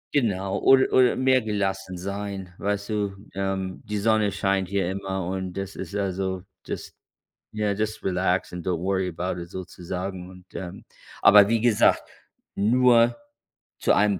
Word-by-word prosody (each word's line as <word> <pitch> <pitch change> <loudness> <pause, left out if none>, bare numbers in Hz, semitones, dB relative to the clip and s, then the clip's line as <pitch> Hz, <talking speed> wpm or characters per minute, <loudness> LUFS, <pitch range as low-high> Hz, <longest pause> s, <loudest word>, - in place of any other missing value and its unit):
Genau, 100 -6 +1
oder 135 0 +5
oder 130 -1 +5
mehr 130 0 +3
gelassen 95 -3 -2
sein, 100 -1 -5
weißt 100 +1 -2
du? 100 -2 -1 0.2
Ähm, 95 -1 -3
die 105 0 -3
Sonne 105 -1 +2
scheint 95 -2 0
hier 95 -2 0
immer 95 -2 -3
und 95 0 -3
das 95 0 -4
ist 100 - -6
also, 95 -2 -2 0.2
das - - -6 0.6
ja, 105 -1 0
das 110 +1 -3
relaxed 90 -1 0
and 90 -2 -6
don't 90 -2 +1
worry 95 0 0
about 90 +1 -3
it 85 - -9
sozusagen 90 0 -6
und, 90 0 -14
ähm 90 -2 -7 0.4
aber 100 -1 +8
wie 115 -1 +2
gesagt, 120 -3 +4 0.5
nur 120 +2 +4 0.6
zu - - +3
einem 100 -3 +3
95 Hz, 150 wpm, -25 LUFS, 95-105 Hz, 0.6 s, aber